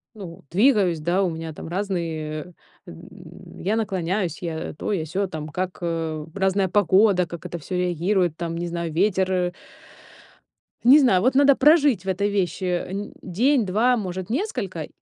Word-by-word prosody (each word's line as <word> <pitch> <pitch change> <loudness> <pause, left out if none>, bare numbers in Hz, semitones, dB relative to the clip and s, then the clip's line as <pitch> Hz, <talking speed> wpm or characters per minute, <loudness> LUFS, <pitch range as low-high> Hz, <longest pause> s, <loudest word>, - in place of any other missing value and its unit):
ну, 175 -7 -10
двигаюсь, 195 - +3
да, 175 +5 +1
у 180 - +1
меня 160 -1 -6
там - - -9
разные, 170 -3 -4 0.3
эм, - - -13
я 210 +4 0
наклоняюсь, 185 -4 -2
я 165 -1 -4
то, 210 - -4
я 165 -6 -1
сё, 190 +5 -2
там 155 -3 -6
как, 180 +4 -4
э, 165 -2 -3
разная 195 0 +1
погода, 195 0 +4
как 170 -1 -9
это 175 - -5
всё 180 +4 -6
реагирует, 180 -1 0
там, 165 -1 -4
не 175 - -3
знаю, 170 -1 -4
ветер, 190 +1 +1
э 180 -1 0 1.3
Не 265 +5 +8
знаю, 195 -10 +4
вот 255 +4 +2
надо 280 0 +6
прожить 285 - +4
в - - -10
этой 195 +2 0
вещи 190 -3 -1
н 185 +3 -3
день 235 +7 +1
2, 225 +7 +2
может, 185 -3 -5
несколько, 225 - -3
185 Hz, 165 wpm, -23 LUFS, 170-205 Hz, 1.3 s, Не